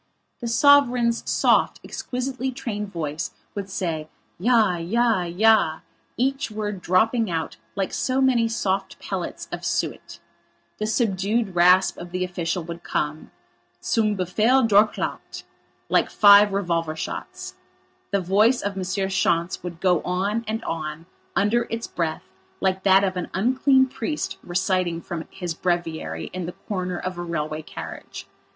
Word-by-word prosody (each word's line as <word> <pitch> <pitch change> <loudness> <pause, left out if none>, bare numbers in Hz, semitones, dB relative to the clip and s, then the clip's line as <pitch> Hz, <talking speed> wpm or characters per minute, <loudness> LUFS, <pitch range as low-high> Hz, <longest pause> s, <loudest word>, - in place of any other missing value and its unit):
The 240 - -4
sovereign's 245 -2 +4
soft, - - +3
exquisitely 255 +1 -4
trained 210 -5 -5
voice 160 -1 -4 0.2
would 200 -1 -5
say, 165 -5 -3 0.3
"Ja, 220 -3 +3
ja, 220 +4 +1
ja!" 175 -2 +3 0.4
each 270 +2 0
word 210 -3 -4
dropping 220 +5 +2
out 165 -2 -3 0.2
like 195 -2 -2
so 260 0 0
many 250 -4 +3
soft 195 -4 -2
pellets - - -5
of - - -5
suet; - - -2 0.6
the 215 - -1
subdued 215 -1 0
rasp 180 +2 +5
of 175 - -8
the 185 +1 -2
official 175 -1 -2
would 170 +1 -7
come: 150 +1 -3 0.5
"Zum 215 -3 +1
Befehl 225 +8 +3
Durchlaucht," 210 0 +1 0.4
like - - +2
five 205 0 +7
revolver 170 -5 -1
shots; - - -6 0.6
the 200 -1 +1
voice 210 +7 +3
of 200 -1 -2
M. 190 - -3 0.2
Schontz 175 -2 0
would 175 -2 -7
go 180 -3 +2
on 200 +5 -1
and 220 +1 -3
on 160 0 -4 0.3
under 210 +6 +2
its 230 0 -3
breath 165 0 -3 0.4
like 190 0 0
that 195 0 +5
of 185 -1 0
an 180 - -3
unclean 260 +5 +4
priest 265 +4 -4
reciting 180 -1 0
from 170 -1 -6
his 175 -3 -5
breviary 165 - -2
in 180 -2 -4
the 175 - -5
corner 185 -3 -2
of 185 -1 -5
a - - -3
railway 155 -2 -3
carriage. - - -9
190 Hz, 140 wpm, -24 LUFS, 175-225 Hz, 0.6 s, five